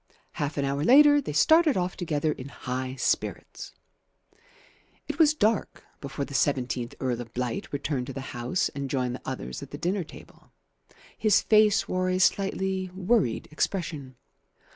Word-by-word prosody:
Half 145 0 -4
an 140 - 0
hour 140 +1 -1
later 290 - +7
they 255 - -5
started 315 - +4
off 180 0 -1
together 155 -3 -1
in 140 -1 -7
high 130 0 -5
spirits. 125 - -2 1.4
It - - -5
was 305 -2 +5
dark 220 -5 0 0.2
before 140 0 -4
the 140 - -11
seventeenth 130 -3 -1
Earl 125 -2 -1
of 115 -1 -10
Blight 125 -1 -3
returned 140 -3 -2
to 135 - -6
the 135 - -5
house 125 +10 -1
and 140 -1 -5
joined 125 -2 -1
the 125 - -7
others 60 +1 -6
at - - -9
the - - -7
dinner 185 +2 -1
table. 160 - -16 0.6
His 215 -3 +3
face 215 -1 +4
wore 185 0 0
a 185 - +1
slightly 190 0 0
worried 190 - +1
expression. 155 -5 -3
150 Hz, 160 wpm, -27 LUFS, 130-190 Hz, 1.4 s, later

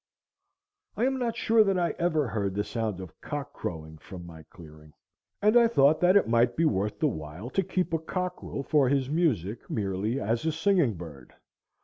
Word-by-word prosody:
I 235 - +2
am 265 0 0
not 235 -2 -1
sure 225 -1 +4
that 195 -2 +1
I 175 -1 +1
ever 160 -5 +1
heard 100 -2 -2
the 105 - 0
sound 110 -5 -3
of 90 -4 -11
cock 145 -1 -5
crowing 80 -2 -6
from 90 +1 -10
my 80 -2 -11
clearing, 75 -2 -15 0.5
and 210 +2 +4
I 235 -1 +7
thought 155 -8 +4
that 180 +2 +6
it 200 - +2
might 120 +1 +2
be 165 - +3
worth 105 -5 0
the - - 0
while 85 - -6
to 195 - +1
keep 180 -1 -2
a 165 - +2
cockerel 180 -3 -4
for 140 -3 +2
his 135 -1 0
music 120 - -1
merely, 105 +4 -2
as 115 +3 -1
a 160 - +1
singing 160 - +2
bird. 75 -7 -11
125 Hz, 195 wpm, -27 LUFS, -, 0.5 s, I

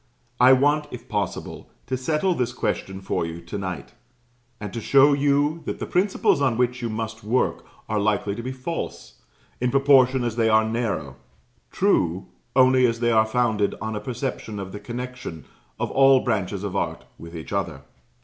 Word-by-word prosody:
I 125 +1 +7
want, 145 +3 +3
if 120 -3 -9
possible, 105 -2 -4 0.2
to 130 - -2
settle 150 +8 0
this 125 -6 -1
question 95 -5 -3
for 95 - -1
you 85 0 -5
to 105 - -6
night, 90 -2 -6 0.7
and 105 -2 -6
to 115 - -4
show 140 +5 +5
you 145 +3 +1
that - - -3
the - - -4
principles 185 -5 +1
on 130 -5 +2
which 125 0 0
you 120 - -2
must 110 0 -5
work 115 +5 0 0.2
are 105 -1 0
likely 105 -1 0
to 115 - -5
be 130 +2 -4
false, 130 +6 -6 0.4
in 125 - +1
proportion 135 -1 +4
as 120 -1 -2
they 115 -1 +3
are 110 0 +4
narrow; 110 - -2 0.5
true, 95 - +1 0.3
only 130 -1 +5
as 115 -1 -2
they 120 0 +2
are 110 -1 +4
founded 110 -3 +1
on 110 0 -4
a - - -2
perception 115 -1 -4
of 95 -1 -6
the 105 - -7
connection 120 -6 -7 0.3
of - - -2
all 135 -1 +5
branches 95 0 -2
of 100 -1 -4
art - - -2
with 85 +1 -10
each 80 +4 -7
other. 85 -9 -3
120 Hz, 180 wpm, -24 LUFS, 105-130 Hz, 0.7 s, I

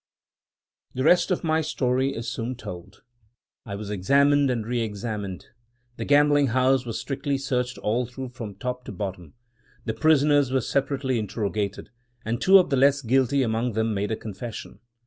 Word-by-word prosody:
" - - -49
The 130 - -1
rest 175 +6 +4
of 180 - -1
my 160 -1 +2
story 135 -3 0
is 115 +1 -5
soon 120 +2 -3
told. 95 -4 -10 0.6
I 100 - -4
was 105 0 -6
examined 140 +8 +3
and 115 -4 -1
re 120 +1 -1
examined; 105 -3 -5 0.5
the - - -4
gambling 145 0 +4
house 130 +1 +2
was 115 - -3
strictly 140 0 -2
searched 125 -2 -2
all 120 +3 -1
through 130 +1 -7
from 115 -5 -8
top 125 0 -4
to - - -7
bottom; 95 -3 -6 0.5
the 110 - -1
prisoners 145 +1 +3
were 130 0 +2
separately 135 0 -1
interrogated; 105 -1 -3 0.3
and 115 +2 -2
two 195 +1 +7
of 180 -5 +2
the 135 - +2
less 140 +1 +3
guilty 130 +3 +2
among 115 +1 -1
them 110 +1 0
made 100 0 -2
a - - +1
confession. 110 +1 -8
125 Hz, 170 wpm, -25 LUFS, 110-140 Hz, 0.6 s, two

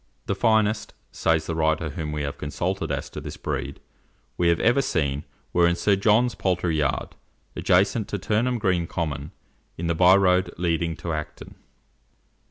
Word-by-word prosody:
"The - - 0
finest," 110 0 +1 0.2
says 80 -1 +1
the 80 - -3
writer 80 0 0
whom 75 0 -4
we 75 -1 -3
have 70 0 -5
consulted 80 +3 -2
as 70 -1 -3
to - - -6
this - - -7
breed, - - -4 0.6
"we 85 - +1
have 85 0 +3
ever 120 +4 +3
seen, 70 - -1 0.3
were 85 -1 +4
in 85 - +2
Sir 100 +3 +2
John's 110 +5 +3
poultry 90 -3 0
yard, 70 -4 -1 0.5
adjacent 100 +4 +2
to 105 - -3
Turnham 115 +5 0
Green 90 -5 0
Common, 75 -4 -3 0.5
in 85 - -4
the 85 - +1
byroad 90 +1 +5
leading 85 -1 0
to 85 +2 -4
Acton." 75 -1 -6
85 Hz, 165 wpm, -24 LUFS, 80-100 Hz, 0.6 s, byroad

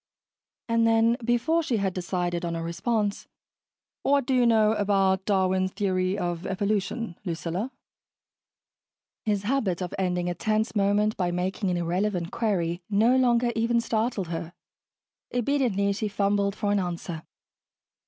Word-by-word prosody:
And 230 0 +3
then, 225 +1 +4
before 240 +8 +2
she 255 -7 -1
had 195 -2 0
decided 175 -1 -2
on 170 -1 -2
a 165 - -3
response, 205 +5 -1 0.7
"What 280 -2 +2
do 265 - 0
you 250 -2 +4
know 220 -2 +4
about 195 -2 +2
Darwin's 185 -2 +1
theory 190 -1 0
of 175 -2 -3
evolution, 200 +1 -2
Lucilla?" 180 +6 -3 1.5
His 205 -2 0
habit 210 -7 0
of 180 -2 -4
ending 180 -1 0
a 175 - 0
tense 215 +4 -1
moment 205 +1 +2
by 180 -2 0
making 185 +3 -1
an 180 - 0
irrelevant 175 +1 -1
query 180 -6 -1
no 220 +5 +4
longer 240 -2 +3
even 230 +1 +2
startled 220 -5 -1
her. 165 0 -5 0.8
Obediently, 245 -6 +1
she 210 +2 -2
fumbled 200 0 0
for 205 -1 -1
an 205 - +2
answer. 175 -2 -4
200 Hz, 140 wpm, -26 LUFS, 180-225 Hz, 1.5 s, then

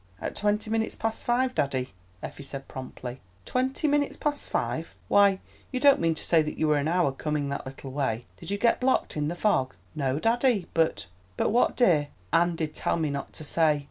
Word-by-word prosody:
"At - - -4
twenty 210 +1 0
minutes 225 0 0
past 225 0 -2
five, 250 +1 +1
daddy," 130 - -1 0.3
Effie - - -7
said 135 -1 -7
promptly. 130 -1 -7 0.2
"Twenty 260 +4 0
minutes 290 -1 +1
past 295 -1 -2
five! - - -2
Why, 200 -1 +5 0.3
you 255 - -1
don't 280 +1 +6
mean 165 -1 +2
to - - -4
say 165 -2 +5
that 150 0 -4
you 155 - +1
were 150 -1 +3
an 145 - -1
hour 170 -3 +2
coming 145 +1 -2
that 140 -1 -4
little 135 0 -8
way! 125 -4 -1
Did - - -9
you 200 - 0
get 230 +3 +3
blocked 260 +1 +1
in 150 -1 0
the 170 - -2
fog?" 175 -9 +1 0.2
"No, 135 -2 -1
daddy, 230 - +2
but——" 160 -12 +1 0.3
"But - - +1
what, 240 +3 +3
dear?" 165 - +4 0.3
"Anne 170 0 +3
did 155 -2 -3
tell - - 0
me 155 -3 0
not 140 -1 -4
to - - -7
say!" 155 -1 +2
165 Hz, 205 wpm, -27 LUFS, 140-225 Hz, 0.3 s, don't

